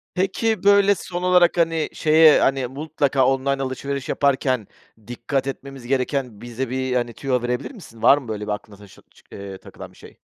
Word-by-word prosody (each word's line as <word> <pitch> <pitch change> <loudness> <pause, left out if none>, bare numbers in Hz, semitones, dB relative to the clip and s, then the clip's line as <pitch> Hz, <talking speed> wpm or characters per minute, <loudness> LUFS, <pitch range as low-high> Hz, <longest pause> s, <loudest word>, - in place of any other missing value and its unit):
Pekii, 205 +4 -1
böyle, 200 0 +5
son 175 0 -6
olarak, 180 -1 +4
hani, 165 -2 +1
şeye, 155 0 +5
hani, 135 -1 +1
mutlaka 140 -1 0
online 135 +1 0
alışveriş 135 +1 -4
yaparken 130 -5 0 0.4
dikkat 125 +3 -3
etmemiz 135 -2 -7
gereken 130 -4 -2
bize 120 +1 -5
bir, 130 0 -2
hani, 120 -1 -1
tüyo 130 0 -2
verebilir 125 - -3
misin? 165 - -14
Var 140 - +6
mı 135 -4 -8
böyle 105 -1 -5
bir - - -2
aklına 105 0 -7
taşı 100 -1 -16
çı - - -23
eee, 100 -1 -8
takılan - - -12
bir - - -22
şey? - - -15
135 Hz, 180 wpm, -22 LUFS, 120-155 Hz, 0.4 s, Var